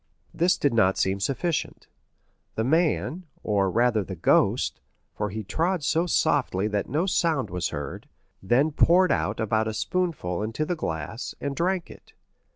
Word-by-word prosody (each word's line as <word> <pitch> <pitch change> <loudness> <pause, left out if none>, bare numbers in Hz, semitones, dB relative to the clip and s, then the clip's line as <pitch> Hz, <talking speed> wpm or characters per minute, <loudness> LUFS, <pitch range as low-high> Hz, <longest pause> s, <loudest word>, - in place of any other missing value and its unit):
This 180 +2 +2
did 145 - +1
not 95 -4 +3
seem 95 +1 0
sufficient; 140 - -2 0.7
the 110 - 0
man, 165 +4 0 0.2
or 100 -3 +1
rather 115 0 +2
the 95 - -7
ghost—for 105 +4 0
he 110 +2 -5
trod 165 - -1
so 165 +4 +1
softly 140 - +1
that 105 -1 -2
no 155 +8 +1
sound 160 - 0
was 90 0 -1
heard—then 95 - -2
poured 180 +5 +4
out 105 +2 0
about 110 0 +1
a 110 - -3
spoonful 155 - -2
into 115 +8 -2
the 175 - -1
glass, 85 - -4
and 140 -1 -3
drank 180 +2 -1
it. - - -16
120 Hz, 150 wpm, -26 LUFS, 100-165 Hz, 0.7 s, poured